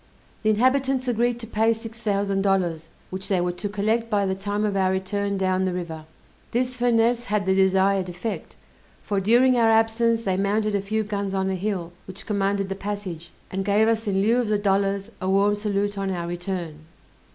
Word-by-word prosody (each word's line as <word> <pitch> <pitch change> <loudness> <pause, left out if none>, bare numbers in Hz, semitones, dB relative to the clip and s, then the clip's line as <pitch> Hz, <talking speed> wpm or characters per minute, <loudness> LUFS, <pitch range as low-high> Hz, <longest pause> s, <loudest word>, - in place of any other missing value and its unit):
The 215 - +1
inhabitants 260 +3 +2
agreed 240 0 +1
to - - -6
pay 225 0 +2
six 225 0 -9
thousand 200 -3 0
dollars, 175 -5 0 0.2
which 190 +1 -5
they 190 -3 +1
were 175 0 0
to 195 +4 -5
collect 220 +3 0
by 205 -3 +1
the 190 - 0
time 205 +2 -2
of 205 -2 -1
our 190 -1 +2
return 200 +1 -1
down 185 -1 +1
the 185 -1 0
river. 165 -3 -5 0.5
This 250 +1 0
finesse 240 0 +2
had 210 -3 0
the 190 - +3
desired 190 0 +3
effect, 180 +6 -5 0.5
for 200 -1 -1
during 245 +6 +4
our 230 -1 +4
absence 225 +1 +2
they 190 -3 0
mounted 210 +2 +1
a 200 - +1
few 215 +2 -1
guns 200 -2 -3
on 190 0 0
a - - -1
hill, 185 -3 -3
which 190 0 -9
commanded 200 -1 0
the - - -1
passage, 195 -5 -5 0.2
and 190 +1 -2
gave 205 +2 +3
us 225 -1 0
in 195 -1 +1
lieu 230 +3 +3
of 245 -2 +1
the 210 0 +2
dollars 200 +1 0
a 185 - -1
warm 200 +2 +3
salute 205 -1 -1
on 195 0 -1
our 175 -2 -3
return. 175 -3 -4
200 Hz, 200 wpm, -24 LUFS, 190-220 Hz, 0.5 s, during